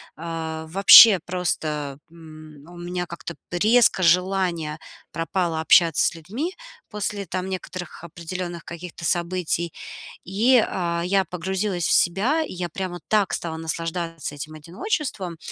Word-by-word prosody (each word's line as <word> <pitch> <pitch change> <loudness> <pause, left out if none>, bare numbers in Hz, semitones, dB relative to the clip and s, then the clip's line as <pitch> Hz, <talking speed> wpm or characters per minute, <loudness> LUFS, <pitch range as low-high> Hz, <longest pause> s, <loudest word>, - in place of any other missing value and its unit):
а, 160 -1 -5
вообще 195 +3 +9
просто, 155 -5 -2
м, 155 -3 -14
у 175 - -13
меня 175 +1 -4
как-то 170 0 -8 0.2
резко 215 +2 +3
желание 175 -3 +1 0.3
пропало 165 -1 -2
общаться 165 +1 +4
с - - 0
людьми 235 - -5 0.4
после 205 -1 -3
там 185 +1 -4
некоторых 185 -2 -7
определенных 170 +1 -6
каких-то 170 0 -9
событий, 170 -1 -1 0.5
и, 225 +6 +3
а, 170 -2 -2
я 195 +1 +2
погрузилась 185 +1 -2
в - - 0
себя, 215 - +3
и - - -8
я 175 -1 -4
прямо 175 0 -5
так 210 -3 +2
стала 160 -1 -4
наслаждаться 165 -1 -4
этим 150 +2 -7
одиночеством. 180 - -4
175 Hz, 130 wpm, -23 LUFS, 165-190 Hz, 0.5 s, вообще